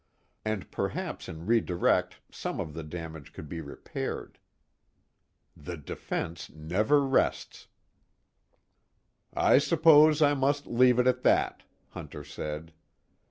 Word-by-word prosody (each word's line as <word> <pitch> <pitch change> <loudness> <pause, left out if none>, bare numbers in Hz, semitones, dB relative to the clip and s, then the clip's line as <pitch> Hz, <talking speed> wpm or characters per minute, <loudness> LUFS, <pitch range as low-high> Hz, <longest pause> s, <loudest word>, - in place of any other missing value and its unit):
And 110 -3 -3
perhaps - - -4
in 80 +1 -8
redirect 110 -6 +1
some - - -5
of 75 - -4
the 80 - -6
damage 80 -2 -8
could 80 - -9
be 80 +2 -6
repaired. 70 -2 -6 1.2
The 85 +4 -7
defense 80 +3 -5
never 95 - +1
rests. 135 -1 0 1.7
"I - - +5
suppose 155 -1 +5
I 145 0 +4
must 140 +1 0
leave 125 0 +4
it 125 - +3
at 125 0 +2
that," - - +2 0.3
Hunter 75 - -8
said. 75 +3 -6
90 Hz, 115 wpm, -28 LUFS, -, 1.7 s, I